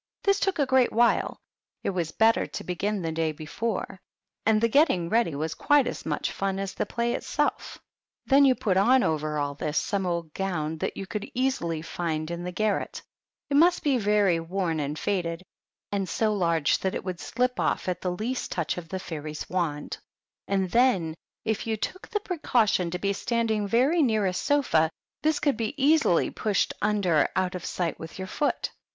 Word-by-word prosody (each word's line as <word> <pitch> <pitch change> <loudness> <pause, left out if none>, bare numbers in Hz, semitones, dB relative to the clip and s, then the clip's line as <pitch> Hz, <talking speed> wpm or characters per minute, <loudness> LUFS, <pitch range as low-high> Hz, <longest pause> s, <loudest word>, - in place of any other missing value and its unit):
This 395 -1 +3
took 390 -2 0
a 285 - +3
great 260 -1 +3
while; 235 +2 +2 0.5
it - - 0
was 175 -4 -2
better 225 +1 +3
to - - -6
begin 195 +2 -2
the 165 - -1
day 160 0 0
before; 185 +6 -4 0.5
and 220 -1 +5
the 230 - +3
getting 225 - +3
ready 225 -8 +2
was 155 +2 -2
quite 290 - +3
as - - -5
much - - -1
fun 195 -1 -2
as 195 -1 -3
the - - -2
play 235 0 -1
itself. - - -2 0.5
Then 275 +1 +5
you 265 -2 +5
put 190 -6 0
on 250 +6 +5
over 155 -1 -1
all 145 -1 -1
this 150 +1 -3
some 195 -2 0
old 170 -3 -3
gown 160 -5 -2
that - - -3
you 195 - -4
could 210 +1 -5
easily 205 -12 0
find 160 -2 -3
in 170 0 -4
the 180 - -4
garret; 215 +3 -1 0.5
it 280 - +4
must 345 +3 +4
be 275 -4 +2
very 205 -5 +3
worn 165 -1 -2
and 145 +1 -2
faded, 170 -2 -2 0.5
and 195 -2 -1
so 215 -1 +1
large 170 -6 +2
that 190 - -1
it - - -3
would 185 -2 -4
slip 250 0 -1
off - - 0
at 180 -1 -2
the 180 - -1
least 225 +8 -3
touch 170 0 -1
of 165 -2 -12
the 190 - -3
fairy's 155 -4 -6
wand; 165 -5 -2 0.5
and 190 -2 0
then, 230 -10 +3 0.3
if 220 0 -1
you 220 -1 0
took 370 - -5
the 420 - -1
precau 305 - +1
tion 180 -3 +1
to 180 - -3
be 200 +2 0
standing 220 -1 0
very 265 - +3
near 220 -7 +2
a 185 - +1
sofa, 180 - +2 0.3
this 310 0 +2
could 290 -4 +2
be 230 +4 -2
easily 290 - +3
pushed 210 -2 0
under 200 -7 +2
out 185 0 0
of 180 -2 -5
sight 175 -3 -2
with 160 0 -8
your 190 - -4
foot. 290 +9 -1
195 Hz, 195 wpm, -27 LUFS, 170-235 Hz, 0.5 s, and